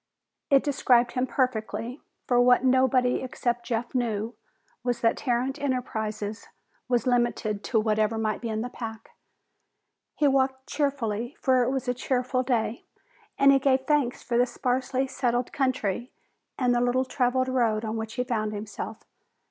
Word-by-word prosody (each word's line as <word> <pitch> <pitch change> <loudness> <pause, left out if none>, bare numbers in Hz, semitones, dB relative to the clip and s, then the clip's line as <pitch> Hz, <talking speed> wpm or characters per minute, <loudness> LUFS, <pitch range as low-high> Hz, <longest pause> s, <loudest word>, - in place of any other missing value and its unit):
It 275 -1 +5
described 250 -4 +3
him 255 +1 -1
perfectly, 250 0 -2 0.2
for 245 -1 +3
what 245 +1 +5
nobody 255 -1 +3
except 240 -2 -2
Jeff 235 0 -2
knew 230 -3 -1 0.5
was 245 -1 -1
that 230 - +3
Tarrant 255 +2 -1
Enterprises 220 -6 -3 0.4
was 245 -2 +1
limited 240 -4 0
to 225 - +2
whatever 215 0 +1
might 215 -1 -1
be 235 - -3
in 220 0 -2
the 245 - -4
pack. 225 -2 -8 1.0
He 295 - +3
walked 265 -1 +1
cheerfully, 245 -5 -2
for 260 -2 +3
it 245 - +2
was 265 -1 -2
a 245 - +2
cheerful 255 +1 0
day, 240 -3 -1 0.5
and 275 0 +6
he 275 - +5
gave 265 -1 +3
thanks 270 -3 0
for 240 0 0
the 245 - +4
sparsely 255 +2 -1
settled 245 -2 -1
country 255 -4 -1 0.5
and 250 -2 +2
the 240 - +2
little 250 +2 +2
traveled 255 0 +1
road 230 -4 +1
on 220 +1 -3
which 220 0 -5
he 250 - 0
found 215 -3 -2
himself. 210 +1 -6
245 Hz, 155 wpm, -26 LUFS, 225-260 Hz, 1.0 s, and